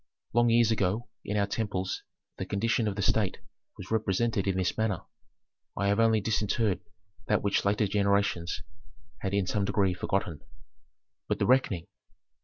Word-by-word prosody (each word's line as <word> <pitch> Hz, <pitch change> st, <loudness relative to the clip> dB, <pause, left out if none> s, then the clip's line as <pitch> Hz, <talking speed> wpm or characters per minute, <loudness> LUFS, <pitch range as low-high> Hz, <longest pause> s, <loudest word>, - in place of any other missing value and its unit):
Long 120 Hz, 0 st, +4 dB
years 115 Hz, -1 st, +4 dB
ago 110 Hz, +2 st, 0 dB
in 105 Hz, -, -2 dB
our 100 Hz, -, +3 dB
temples 100 Hz, -3 st, -2 dB, 0.4 s
the -, -, -2 dB
condition 115 Hz, +2 st, +1 dB
of 100 Hz, -, -1 dB
the 100 Hz, -, -2 dB
state 105 Hz, -2 st, +2 dB, 0.4 s
was 95 Hz, -1 st, -9 dB
represented 110 Hz, -1 st, +1 dB
in 95 Hz, -1 st, +1 dB
this 95 Hz, -1 st, 0 dB
manner. 110 Hz, -4 st, -1 dB, 0.7 s
I 100 Hz, +1 st, +1 dB
have 100 Hz, +2 st, +2 dB
only 115 Hz, -1 st, +4 dB
disinterred 105 Hz, -1 st, 0 dB, 0.5 s
that 105 Hz, -, +2 dB
which 100 Hz, -1 st, +1 dB
later 105 Hz, +2 st, +2 dB
generations 100 Hz, -3 st, +1 dB, 0.6 s
had 100 Hz, 0 st, -2 dB
in 100 Hz, -2 st, +2 dB
some 100 Hz, +2 st, 0 dB
degree 100 Hz, -1 st, +2 dB
forgotten." 90 Hz, -4 st, -2 dB, 0.9 s
"But -, -, 0 dB
the -, -, +1 dB
reckoning?" 125 Hz, -9 st, +2 dB
100 Hz, 155 wpm, -29 LUFS, 95-110 Hz, 0.9 s, Long